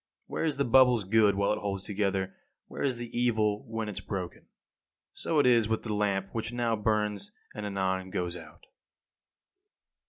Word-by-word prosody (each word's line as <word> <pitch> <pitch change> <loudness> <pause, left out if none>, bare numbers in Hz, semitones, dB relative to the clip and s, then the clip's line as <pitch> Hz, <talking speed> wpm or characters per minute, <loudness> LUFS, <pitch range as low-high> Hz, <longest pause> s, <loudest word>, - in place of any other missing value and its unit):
Where - - -3
is 150 -4 0
the 140 - +1
bubble's 125 -2 +5
good 105 0 +4
while 100 +1 +2
it - - -3
holds 100 -2 -3
together, 95 -2 -1 0.3
where - - -8
is 130 -3 +1
the 120 -1 -7
evil 110 -4 +1
when 115 -1 -3
it - - -3
is 95 - -6
broken? 95 -3 -6 0.7
So 160 - -2
it 145 - +5
is 120 -3 +4
with 110 - 0
the 110 - -2
lamp 100 -2 0
which 115 0 -3
now 120 -1 0
burns 105 -1 -1 0.2
and 105 -1 -5
anon 95 -1 -1
goes 90 -1 -2
out. 85 -3 -12
105 Hz, 180 wpm, -29 LUFS, 95-115 Hz, 0.7 s, bubble's